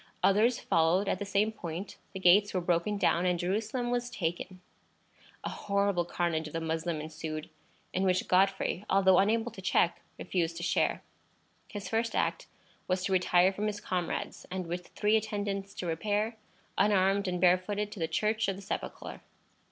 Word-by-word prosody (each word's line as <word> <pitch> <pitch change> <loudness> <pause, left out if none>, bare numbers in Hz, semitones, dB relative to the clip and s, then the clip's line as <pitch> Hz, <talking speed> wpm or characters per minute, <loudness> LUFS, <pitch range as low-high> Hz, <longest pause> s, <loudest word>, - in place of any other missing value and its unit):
Others 220 +5 +4
followed 165 +5 +2
at - - 0
the 205 - -3
same 200 +2 +2
point; 175 -2 -6 0.2
the 190 - -5
gates 195 +3 +5
were - - +3
broken 175 +4 0
down, 180 -2 +2
and 180 -1 +2
Jerusalem 215 +7 -1
was 245 0 -1
taken. 180 -2 -4 0.8
A - - -2
horrible 200 -3 0
carnage 170 -2 -1
of 150 - -11
the 165 - -1
Moslem 160 0 -2
ensued, 155 0 -6 0.4
in 185 - 0
which 185 -1 +1
Godfrey, 190 0 +2
although 190 -1 +5
unable 225 +4 +2
to 205 - -10
check, 175 -2 +2 0.2
refused 170 -2 -2
to 175 - -5
share. 170 - +1 0.6
His 205 -2 -6
first 225 0 -1
act - - 0 0.4
was 185 0 0
to 190 - 0
retire 185 0 +4
from 210 +2 -2
his 205 -1 -3
comrades, 180 -4 -3
and 185 0 -3
with 175 +1 -5
three 210 +1 +1
attendants 205 -2 -3
to - - -5
repair, 205 +7 -1 0.4
unarmed 195 0 +3
and 180 -1 -1
barefooted, 185 +4 +2
to 205 - -8
the 165 - 0
Church 215 +6 0
of 195 - -1
the 195 - -10
Sepulchre. 195 - -5
190 Hz, 170 wpm, -30 LUFS, 175-205 Hz, 0.8 s, gates